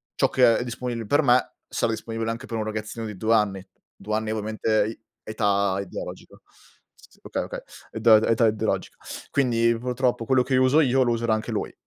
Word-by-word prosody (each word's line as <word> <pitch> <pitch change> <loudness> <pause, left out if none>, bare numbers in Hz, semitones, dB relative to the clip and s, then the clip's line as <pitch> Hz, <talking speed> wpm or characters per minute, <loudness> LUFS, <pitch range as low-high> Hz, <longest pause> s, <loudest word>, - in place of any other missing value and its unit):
ciò - - +2
che 120 -3 +4
è - - -2
disponibile 120 -2 -4
per 145 +6 +3
me 125 -1 +3
sarà 115 - -1
disponibile 115 0 -4
anche 120 +3 -6
per 115 - -4
un 110 - -1
ragazzino 110 +1 -5
di 105 -3 -8
2 110 +2 +1
anni, 100 -3 0 0.3
2 105 - -6
anni 110 0 -2
ovviamente 110 0 0
i 110 - -7 0.2
età 100 -3 0
ideologica. 95 - -8 0.6
S - - -21
okay, - - -3
okay. - - -6 0.3
Edà 110 -1 +4
età 115 0 +4
ideologica. 110 0 -2 0.3
Quindi, 115 -4 +2
purtroppo 125 -1 -1
quello 130 +1 +3
che 130 0 0
uso 130 +5 +4
io 130 -1 +3
lo 120 - +1
userà 115 -1 0
anche 110 - -2
lui. - - -3
115 Hz, 185 wpm, -24 LUFS, 110-125 Hz, 0.6 s, che